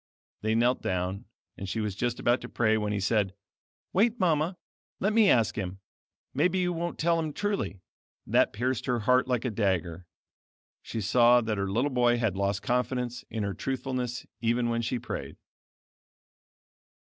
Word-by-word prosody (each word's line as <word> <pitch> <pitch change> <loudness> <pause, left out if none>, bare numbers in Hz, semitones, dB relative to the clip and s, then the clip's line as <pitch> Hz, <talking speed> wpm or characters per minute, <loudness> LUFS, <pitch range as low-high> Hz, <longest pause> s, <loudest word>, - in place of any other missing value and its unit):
They 110 +1 +1
knelt 120 +2 +2
down, 90 +1 -2 0.3
and 95 - -5
she 110 - -2
was 105 -2 -1
just 120 +3 -1
about 120 +1 +2
to - - -8
pray 110 -2 +2
when 105 -1 -1
he 105 - -1
said, 100 -1 +1 0.6
"Wait, 225 +5 +2
Mama, 170 -1 +1 0.4
let 205 +3 +1
me 220 -3 +5
ask 115 -3 +3
Him; 95 -1 -4 0.5
maybe 175 +7 +2
you 180 -1 +1
won't 170 +1 -3
tell 165 +1 +2
Him 160 -2 -2
truly." 200 - -2 0.4
That - - +3
pierced 125 +3 -2
her 125 -3 +1
heart 125 +4 +3
like 125 -1 0
a 125 - 0
dagger. 90 -5 -1 0.7
She 115 - -5
saw 120 +4 +5
that 110 -3 -2
her 100 0 -1
little 125 +9 +1
boy 120 -1 +3
had 110 -5 0
lost 100 0 -1
confidence 125 -1 -1
in 110 -2 -3
her 100 -1 -2
truthfulness 125 +2 -3
even 120 +1 +1
when 115 0 0
she 115 +2 -1
prayed. - - -6
120 Hz, 170 wpm, -28 LUFS, 105-130 Hz, 0.7 s, me